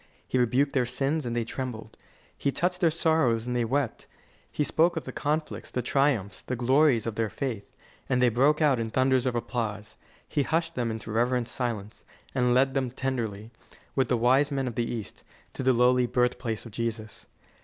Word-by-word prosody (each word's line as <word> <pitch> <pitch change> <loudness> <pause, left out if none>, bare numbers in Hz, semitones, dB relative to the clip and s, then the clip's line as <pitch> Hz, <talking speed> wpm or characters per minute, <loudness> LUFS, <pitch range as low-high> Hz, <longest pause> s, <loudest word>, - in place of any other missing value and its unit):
He 130 - 0
rebuked 125 +4 +2
their 125 -3 +1
sins, 135 +3 -1
and 120 - -2
they 120 - +1
trembled. 115 -2 -6 0.4
He 140 - -1
touched 180 +5 -1
their 170 - +5
sorrows, 155 -8 +2
and 125 0 -2
they 120 - +2
wept. 130 +1 -1 0.4
He 150 - 0
spoke 165 +3 +2
of 160 - -2
the 130 - -7
conflicts, 150 +4 -2
the 125 - -2
triumphs, 120 -8 +1
the 125 - -4
glories 130 0 +3
of 115 - -2
their 110 0 -1
faith, 110 0 -4 0.4
and 125 - +2
they 125 -1 +5
broke 140 +7 +3
out 140 -5 +3
in 115 -1 -2
thunders 130 +2 +2
of 125 - -1
applause. 110 -3 -3 0.3
He 145 - 0
hushed 165 +3 0
them 120 -4 -1
into 110 0 -5
reverent 120 +2 +1
silence, 115 -5 -4 0.3
and 125 -2 +2
led 135 +1 +3
them 135 -2 0
tenderly, 115 -5 -3 0.4
with 135 - +2
the 125 - +1
wise 130 +5 +3
men 135 -2 -1
of 120 - -3
the 115 +1 -2
East, 115 -4 -6 0.3
to - - -4
the 130 0 +4
lowly 125 0 +4
birthplace 125 -2 -1
of 115 - -9
Jesus. 110 -1 -5
125 Hz, 195 wpm, -27 LUFS, 115-135 Hz, 0.4 s, their